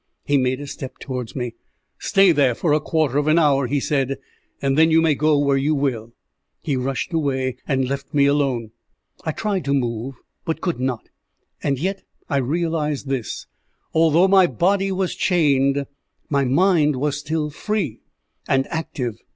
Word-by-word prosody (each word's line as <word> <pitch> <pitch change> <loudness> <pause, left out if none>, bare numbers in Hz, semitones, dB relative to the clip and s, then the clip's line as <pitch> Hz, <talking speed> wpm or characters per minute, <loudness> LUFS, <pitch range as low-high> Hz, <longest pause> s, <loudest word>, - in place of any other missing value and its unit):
He 145 - +1
made 130 -1 +1
a 145 - -6
step 135 -1 -7
towards 125 -4 -5
me. 125 -3 -3 0.5
"Stay 195 -2 +4
there 140 -6 +3
for 155 +2 +1
a 150 - +4
quarter 150 -3 0
of 145 - -1
an 155 +2 +4
hour," 140 -5 +3
he 145 +3 0
said, 135 -1 0 0.4
"and 135 -1 0
then 160 +2 +5
you 160 0 +5
may 160 -2 +3
go 150 +1 +2
where 140 -1 +2
you 145 +3 +1
will." 125 -5 -2 0.5
He 145 - 0
rushed 130 +5 -2
away, 130 -5 -1
and 130 -2 +1
left 140 +1 -4
me 145 -2 +3
alone. 135 -6 +1 0.5
I 160 - 0
tried 200 +1 -2
to 140 0 +1
move, 120 0 -2 0.3
but 160 - -2
could 175 -7 -2
not; 125 -3 -3 0.5
and 140 -1 0
yet 190 +7 -2 0.3
I 140 - +2
realized 150 0 -1
this 130 -4 -3 0.5
although 165 +3 +4
my 190 -2 +6
body 195 +3 +1
was 190 -1 -1
chained, 140 -5 +2 0.5
my 140 -1 +2
mind 150 +1 +3
was 145 +2 -1
still 150 +1 -2
free 190 - -2 0.5
and 135 0 +2
active. 145 -9 -3
145 Hz, 170 wpm, -22 LUFS, 135-160 Hz, 0.5 s, my